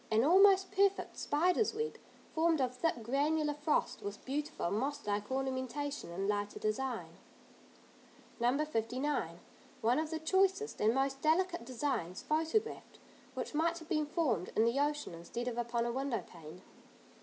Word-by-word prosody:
An 220 +1 +3
almost 385 +4 +6
perfect 395 0 +2
spider's 360 +8 +1
web, 455 +1 -2 0.4
formed 325 -1 +3
of 255 -1 0
thick, 250 -4 -1
granular 295 +5 +1
frost, 295 +1 0
with 205 0 -6
beautiful 290 - -2
moss 270 +7 -2
like 205 0 -1
ornamentation 265 -2 -2
in 195 +3 -2
lighter 205 0 -1
design. 240 +4 -2 1.2
No. 250 +6 +2
59. 245 - -2 0.4
One 240 +5 +3
of 315 0 -2
the 320 - -2
choicest 380 +6 +1
and 220 +3 +4
most 270 0 0
delicate 345 -2 +2
designs 235 - -2
photographed 320 +8 -1 0.4
which - - -4
might 330 +3 +1
have 310 -2 -1
formed 250 - 0
in 220 - +4
the 235 +4 +2
ocean 295 -6 0
instead 205 +9 -5
of 245 - -2
upon 235 0 0
a 235 - 0
window 265 -1 -2
pane. 170 +1 -12
275 Hz, 145 wpm, -34 LUFS, 230-320 Hz, 1.2 s, almost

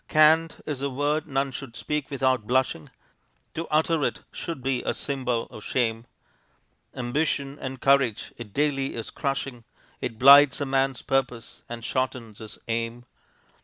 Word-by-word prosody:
Can't 160 +1 +4
is 145 -3 -4
a 140 - 0
word 145 +4 -1
none 135 -1 0
should 130 -2 -8
speak 135 +6 -3
without 130 -5 +1
blushing; 130 -10 0 0.6
To 165 +1 -4
utter 155 0 +2
it - - -2
should 165 -7 -6
be 130 -2 0
a - - -2
symbol 125 -4 -1
of 110 - -10
shame; 115 -2 -1 0.9
Ambition 140 +2 -1
and 130 -1 -5
courage 135 -5 +2
it 115 -4 -9
daily 135 +1 0
is 115 -2 -5
crushing; 135 -4 -3 0.4
It 115 - -4
blights 140 +3 +8
a 145 - -1
man's 135 -1 0
purpose 130 -3 -2
and 115 -1 -6
shortens 125 -5 -2
his 110 -2 -9
aim. 115 +1 -3
135 Hz, 150 wpm, -26 LUFS, 120-140 Hz, 0.9 s, blights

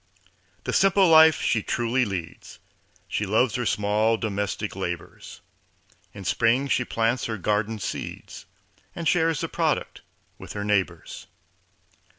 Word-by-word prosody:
The - - -3
simple 195 0 +4
life 160 -1 +7
she 110 - +1
truly 120 +4 0
leads, 90 -5 -7 0.5
She 105 - -2
loves 110 +4 +2
her 125 -2 -1
small 105 +2 +1
domestic 105 -1 -3
labors; 90 -3 -6 0.7
In 100 -2 -10
spring 120 +7 +2
she 125 - +2
plants 115 +1 -1
her 110 -1 -3
garden 105 +3 -1
seeds 100 - -7 0.5
And 165 -1 -3
shares 165 -1 +2
the - - -2
product - - -2 0.4
with - - -9
her 105 - -4
neighbors. 100 -2 -2
110 Hz, 130 wpm, -25 LUFS, 105-130 Hz, 0.7 s, life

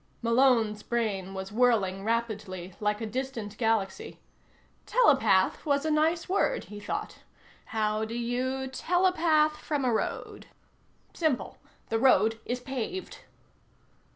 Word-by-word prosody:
Malone's 230 -3 +3
brain 200 -6 -2
was 190 +1 -5
whirling 210 -5 +2
rapidly, 210 -5 -3
like 210 0 -1
a - - -2
distant 230 -3 -4
galaxy. 225 - -1 0.7
Telepath - - +3
was 285 -1 +1
a 315 - +1
nice 320 +2 +1
word, 400 +6 +1
he 210 0 -10
thought. 205 - -5 0.5
How 215 -1 -1
do 220 +1 -4
you 255 +3 -2
telepath 320 0 +2
from 290 -3 -2
a 245 - +2
road? 220 - -3 0.7
Simple. 275 - -1 0.3
The 225 - +1
road 225 -3 +4
is 245 +1 -2
paved. 265 +8 -5
235 Hz, 120 wpm, -28 LUFS, 215-285 Hz, 0.7 s, road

